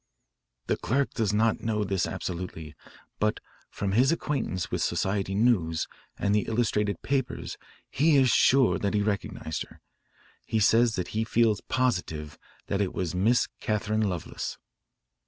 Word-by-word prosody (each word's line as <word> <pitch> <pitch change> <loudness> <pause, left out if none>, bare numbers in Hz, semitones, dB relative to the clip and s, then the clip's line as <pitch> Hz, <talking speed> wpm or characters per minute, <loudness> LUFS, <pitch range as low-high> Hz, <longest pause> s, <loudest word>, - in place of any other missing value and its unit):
"The - - 0
clerk 135 +4 0
does 110 -4 0
not 110 +1 +2
know 110 -2 0
this 95 -3 0
absolutely, 85 -4 -5 0.5
but - - +1 0.3
from 100 -1 -3
his 125 +8 +4
acquaintance 140 - -2
with - - -1
society 95 0 0
news 95 -8 +2 0.3
and 100 - +1
the 105 - +1
illustrated 105 -4 0
papers 135 -1 -2 0.3
he 155 +2 +3
is 130 -3 +5
sure 135 -1 +4
that 100 +1 -1
he 105 - +2
recognised 100 -6 -3
her. - - -18 0.6
He 110 - -1
says 115 +3 +4
that 90 -2 -3
he 110 +1 -1
feels 110 -2 +2
positive 85 -12 -1 0.3
that 100 0 -1
it 95 - -2
was 90 -2 -2
Miss 110 +7 +3
Catharine 110 -1 0
Lovelace." 90 -3 -5
105 Hz, 145 wpm, -27 LUFS, 95-115 Hz, 0.6 s, is